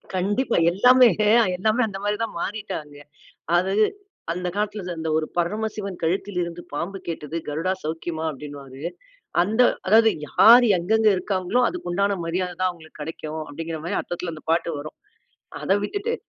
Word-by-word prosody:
கண்டிப்பா. 205 +7 0
எல்லாமே 250 +7 +6 0.5
எல்லாமே 215 +6 +1
அந்த 195 -2 -6
மாரிதான் 210 0 -2
மாறிட்டாங்க. 180 -8 -5 0.6
அது 185 +2 +1 0.6
அந்த 180 +1 -3
காலத்துல 205 -3 -2
அந்த 160 0 -3
ஒரு 155 0 0
பரமசிவன் 200 +1 -2
கழுத்திலிருந்து 175 0 -2
பாம்பு 180 +6 -3
கேட்டது 160 -1 -5
கருடா 160 +5 -1
சௌக்கியமா 160 +1 -4
அப்டின்னுவாரு. 140 -2 -9 0.6
அந்த 220 +7 +2 0.2
அதாவது 220 +3 +6 0.2
யார் 235 - +8
எங்கெங்க 215 +5 +2
இருக்காங்களோ 185 +4 0
அதுக்கு 355 - -6
உண்டான 200 +2 +1
மரியாதைதான் 180 +1 -1
அவுங்களுக்கு 160 -3 -14
கெடைக்கும், 155 0 -5
அப்டிங்கிற 165 +2 -5
மாரி 170 - -2
அர்த்தத்துல 175 0 -5
அந்த 155 - -12
பாட்டு 165 0 +1
வரும். 150 +2 -8 0.7
அத - - +1
விட்டுட்டு 430 - -2
180 Hz, 135 wpm, -23 LUFS, 165-210 Hz, 0.7 s, யார்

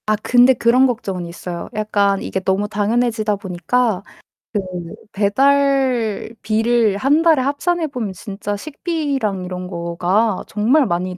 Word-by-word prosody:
아. 215 - +3
근데 245 +4 +4
그런 250 +2 +4
걱정은 195 -7 -3
있어요. 170 0 -7
약간 205 -2 +1
이게 190 - -3
너무 190 +2 0
당연해지다 215 +1 0
보니까 195 +3 -1 0.5
그 210 - +1 0.5
배달비를 230 -2 +1
1 285 +9 +2
달에 320 -5 +4
합산해 320 +5 0
보면 240 -9 -4
진짜 200 +1 -5
식비랑 275 - -3
이런 180 0 -5
거가 180 +4 0
정말 250 +8 +2
많이 180 -1 -2
215 Hz, 270 characters per minute, -19 LUFS, 195-255 Hz, 0.5 s, 근데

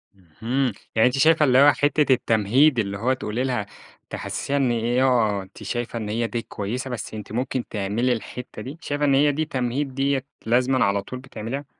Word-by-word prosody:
اهم، 115 - -2 0.2
يعني 110 +2 +5
أنتِ 125 +2 -1
شايفة 155 +2 +5
اللي 130 -2 +4
هو 145 +1 +8
حِتّة 145 -1 +2
التمهيد 120 +4 +3
اللي 100 -2 -2
هو 125 +6 +1
تقولي 125 -1 -3
لها 125 -6 -1 0.4
تحسّسيها 140 - -3
إن 135 -3 +2
إيه، 120 +2 +1
آه، 110 -6 +2
أنتِ 95 +3 -14
شايفة 120 +3 -3
إن 105 -2 -5
هي 115 +2 -1
دي 115 0 -3
كويسة 115 +6 -5
بس 125 -3 -6
أنتِ 105 -2 -8
ممكن 125 +1 -2
تعملي 110 +5 0
الحِتّة 125 +2 -7
دي، 140 +5 -8
شايفة 145 -1 -1
إن 140 - +3
هي 145 +1 +4
دي 155 +2 -1
تمهيد 130 0 -2
ديّة 135 -1 0 0.2
لازمًا 125 +3 +3
على 100 0 +1
طول 125 +5 -8
بتعمليها؟ 130 +1 -6
125 Hz, 195 wpm, -23 LUFS, 110-135 Hz, 0.4 s, هو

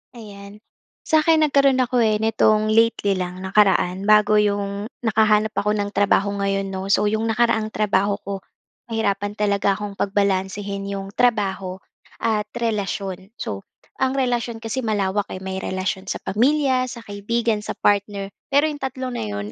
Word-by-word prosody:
Ayan, 205 -1 -11 0.4
sa'kin 315 0 +3
nagkaroon 275 -3 +4
ako 245 0 0
eh, 215 -2 +3
nitong 215 -1 +2
lately 225 -2 +3
lang, 180 +1 -5
nakaraan, 190 -1 +2
bago 210 0 +5
yung 200 0 -1 0.2
nakahanap 215 -1 +3
ako 210 +1 0
ng 205 -1 -1
trabaho 200 0 +2
ngayon, 195 0 0
'no? 190 0 -4
So, 205 +1 +3
yung 220 +1 0
nakaraang 225 -1 +1
trabaho 200 -1 +1
ko 200 - -4 0.5
nahirapan 205 -2 -1
talaga 200 -1 +1
akong 205 -1 -7
pagbalansehin 200 0 -1
yung 195 0 -5
trabaho 200 -5 0 0.5
at 215 -2 +1
relasyon. 200 -3 -3
So, 100 -1 -6 0.3
ang 265 +1 +1
relasyon 240 -3 -1
kasi 225 +4 -3
malawak, 205 -4 -1
eh. 185 - -7
May 190 0 -4
relasyon 190 0 -3
sa - - -4
pamilya, 260 +3 +2
sa 235 -2 -8
kaibigan, 220 +2 -1
sa 210 - -6
partner 200 -1 0 0.2
pero 285 +2 +3
yung 290 - -8
tatlo 260 -1 -4
na 240 - -4
'yon 100 0 -5
210 Hz, 150 wpm, -22 LUFS, 195-230 Hz, 0.5 s, bago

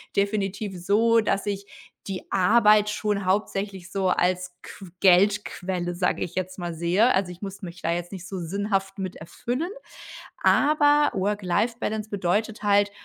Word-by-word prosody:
definitiv 200 -1 -1
so, 230 +3 +4
dass 200 -2 -1
ich 200 -1 -3 0.4
die 190 -2 -6
Arbeit 210 +2 +4
schon 210 -2 -1
hauptsächlich 195 -1 -2
so 195 -1 0
als 180 0 0
qu 195 - -11
Geldquelle, 185 -2 +2
sage 180 +1 -1
ich 175 - -7
jetzt 185 0 -3
mal, 175 -1 -4
sehe. 175 +9 +2
Also, 190 -2 0
ich 180 - -12
muss 200 0 -7
mich 175 -2 -9
da 165 - 0
jetzt 175 0 -3
nicht 190 -2 -8
so 195 -1 -5
sinnhaft 195 +2 -2
mit 185 -2 -4
erfüllen. 245 - -4 0.7
Aber 295 0 +4
Work-Life-Balance 210 +3 -1
bedeutet 205 +3 -1
halt, 205 0 +3
195 Hz, 145 wpm, -25 LUFS, 180-210 Hz, 0.7 s, so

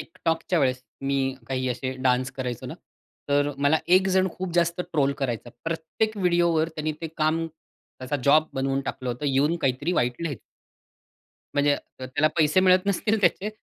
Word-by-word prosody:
TikTokच्या 165 +2 -1
वेळेस 130 -2 +1 0.2
मी 135 -1 0
काही 130 -1 -1
असे 130 +1 -3
डान्स 125 +1 +2
करायचो 125 -3 -4
ना, - - -6 0.5
तर 145 0 +2
मला 145 +3 +3 0.2
एकजण 190 0 +2
खूप 185 -1 -5
जास्त 170 0 +2
ट्रोल 150 -6 0
करायचा, 120 -3 -3
प्रत्येक 165 +7 -2
व्हिडिओवर 170 -4 +2
त्यांनी 155 -1 -3
ते 165 - -3
काम 160 +1 +1
त्याचा 145 -3 -8
जॉब 155 +2 +5
बनवून 135 0 0
टाकलं 130 -2 -5
होतं 125 +5 -4
येऊन 145 +5 +2
काहीतरी 135 +6 0
वाईट 125 -3 0
लिहायचं. 155 -6 -3 1.1
म्हणजे 145 0 +3
अ, 130 - -10
त्याला 145 +4 +2
पैसे 155 +3 +4
मिळत 185 +1 +4
नसतील 210 +2 +1
त्याचे. 190 +3 +2
155 Hz, 160 wpm, -25 LUFS, 135-170 Hz, 1.1 s, जॉब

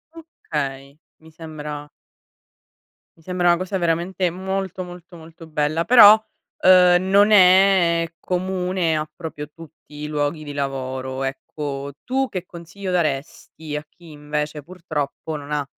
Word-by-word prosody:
Okay, 145 - -6 0.2
mi 160 0 -17
sembra 150 -2 -8 1.3
mi 160 - -23
sembra 180 0 +1
una 175 - +4
cosa 185 +2 -3
veramente 175 +2 0
molto, 190 +1 -4
molto, 175 0 -12
molto 165 0 -13
bella 155 +1 0
però, 215 -2 +9 0.5
uhm, 180 0 +6
non 205 +2 +5
è 180 -3 +5
comune 180 -2 -1
a 155 0 -4
proprio 155 -3 -7
tutti 160 -1 -16
i - - -3
luoghi 150 +1 -2
di 145 -1 -7
lavoro 130 -1 -4
ecco. 140 +1 -5
Tu 265 +1 0
che 185 -2 -5
consiglio 180 +3 -8
daresti 155 -1 -3
a 150 0 -5
chi 170 -3 -16
invece 150 0 -4
purtroppo 160 -3 -5
non 145 0 -8
ha 145 -1 -1
165 Hz, 135 wpm, -21 LUFS, 150-185 Hz, 1.3 s, però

